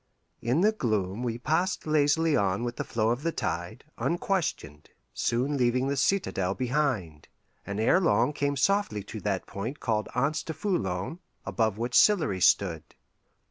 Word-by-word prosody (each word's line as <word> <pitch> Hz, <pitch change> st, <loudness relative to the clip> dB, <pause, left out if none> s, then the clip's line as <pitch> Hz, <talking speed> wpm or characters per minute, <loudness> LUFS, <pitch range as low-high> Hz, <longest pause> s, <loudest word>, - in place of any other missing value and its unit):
In 125 Hz, +8 st, +1 dB
the 210 Hz, +3 st, +5 dB
gloom 110 Hz, -, -1 dB
we 120 Hz, -2 st, -2 dB
passed 160 Hz, +9 st, 0 dB
lazily 155 Hz, +1 st, +3 dB
on 100 Hz, 0 st, +1 dB
with 120 Hz, 0 st, -4 dB
the -, -, -2 dB
flow 110 Hz, 0 st, 0 dB
of 120 Hz, +3 st, -2 dB
the 165 Hz, +2 st, 0 dB
tide, 95 Hz, -, -4 dB, 0.2 s
unquestioned, 170 Hz, -, -2 dB, 0.2 s
soon 130 Hz, +5 st, 0 dB
leaving 125 Hz, +1 st, +1 dB
the 140 Hz, -, 0 dB
citadel 130 Hz, -, 0 dB
behind, 125 Hz, -, -1 dB, 0.4 s
and 100 Hz, +1 st, -3 dB
ere 115 Hz, +12 st, +4 dB
long 160 Hz, -4 st, +2 dB
came 145 Hz, -1 st, -1 dB
softly 165 Hz, -, +1 dB
to 110 Hz, +2 st, -7 dB
that 100 Hz, -3 st, -2 dB
point 115 Hz, +9 st, -5 dB
called 110 Hz, -3 st, -1 dB
Anse 145 Hz, +5 st, +1 dB
du 160 Hz, -, -5 dB
Foulon, 155 Hz, -, -2 dB, 0.3 s
above 105 Hz, +2 st, 0 dB
which 120 Hz, +2 st, -3 dB
Sillery 155 Hz, -, +4 dB
stood. -, -, +2 dB
125 Hz, 155 wpm, -28 LUFS, 105-155 Hz, 0.4 s, the